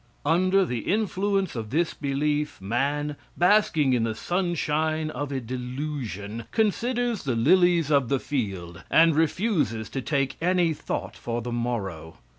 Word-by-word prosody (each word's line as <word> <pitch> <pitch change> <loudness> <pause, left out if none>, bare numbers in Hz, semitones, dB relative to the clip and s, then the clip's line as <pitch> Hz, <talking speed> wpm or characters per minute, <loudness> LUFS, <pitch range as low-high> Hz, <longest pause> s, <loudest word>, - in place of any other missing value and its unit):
Under 185 +5 +3
the 125 -7 -2
influence 195 -3 0
of 110 -2 -4
this 165 +6 +1
belief, 150 +1 -1
man, 140 +8 -1 0.2
basking 175 -7 +4
in 120 - +2
the 110 -1 -1
sunshine 160 - -1
of 145 -2 -4
a 135 - -1
delusion, 125 -4 -5
considers 235 +1 0
the 130 -4 -1
lilies 170 +4 +4
of 140 -5 +3
the 135 - +2
field 95 -12 -4
and 165 -1 +5
refuses 155 - 0
to 135 - -3
take 135 0 -1
any 175 -1 +2
thought - - -4
for 120 0 -3
the 120 - -4
morrow. 100 -10 -3
145 Hz, 140 wpm, -26 LUFS, 120-175 Hz, 0.2 s, and